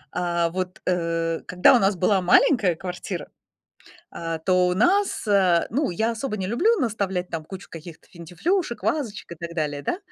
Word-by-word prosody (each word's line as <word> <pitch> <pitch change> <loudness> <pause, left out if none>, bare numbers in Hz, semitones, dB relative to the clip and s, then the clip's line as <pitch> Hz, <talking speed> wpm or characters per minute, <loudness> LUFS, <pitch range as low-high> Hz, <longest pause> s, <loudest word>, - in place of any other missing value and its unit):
А, 170 -1 0
вот, 185 0 -4
э, 165 -2 -1
когда 180 +7 +5
у - - +4
нас 195 -1 +2
была 190 +2 +2
маленькая 185 - +4
квартира, 180 -1 -6 0.8
а, 165 -1 -4
то 180 +2 +2
у 180 - 0
нас, 375 - +1
э, 190 -5 +3
ну, 275 +5 0
я 220 +7 0
особо 230 0 -4
не 190 -2 -3
люблю 340 - +2
наставлять 200 - -2
там 160 -2 -5
кучу 190 +3 -10
каких-то 165 0 -11
финтифлюшек, 210 - -3
вазочек 220 - -2
и - - -6
так 170 +1 -8
далее, 145 -3 -2
да, 345 - -2
185 Hz, 170 wpm, -24 LUFS, 170-220 Hz, 0.8 s, когда